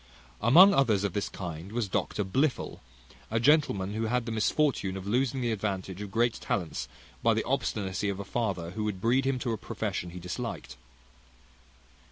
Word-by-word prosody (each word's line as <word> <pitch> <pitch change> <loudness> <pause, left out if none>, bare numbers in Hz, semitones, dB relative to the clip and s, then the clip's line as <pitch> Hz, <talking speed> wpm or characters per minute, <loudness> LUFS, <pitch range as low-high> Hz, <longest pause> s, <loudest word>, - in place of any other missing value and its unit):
Among 180 - +8
others 110 - +3
of 100 -3 -1
this 100 - -1
kind 85 0 -7
was 115 -2 -1
Dr 105 +1 -1
Blifil, 130 +9 0 0.5
a 115 - +1
gentleman 115 -8 +3
who 110 +1 -1
had 125 +1 0
the 115 - -4
misfortune 110 -3 +1
of 95 - -7
losing 130 +4 0
the 120 -1 0
advantage 95 -3 -3
of 105 - -5
great 115 +3 +2
talents 90 -5 -2 0.3
by - - +3
the - - 0
obstinacy 100 0 -1
of 100 -1 -3
a 100 - -5
father, 95 -8 -2
who 105 +3 -3
would 105 -3 -2
breed 125 +6 +2
him 135 -1 +1
to 125 -1 -2
a 110 - -1
profession 90 - -3
he 90 +1 -8
disliked. 90 0 -5
105 Hz, 180 wpm, -29 LUFS, 95-120 Hz, 0.5 s, Among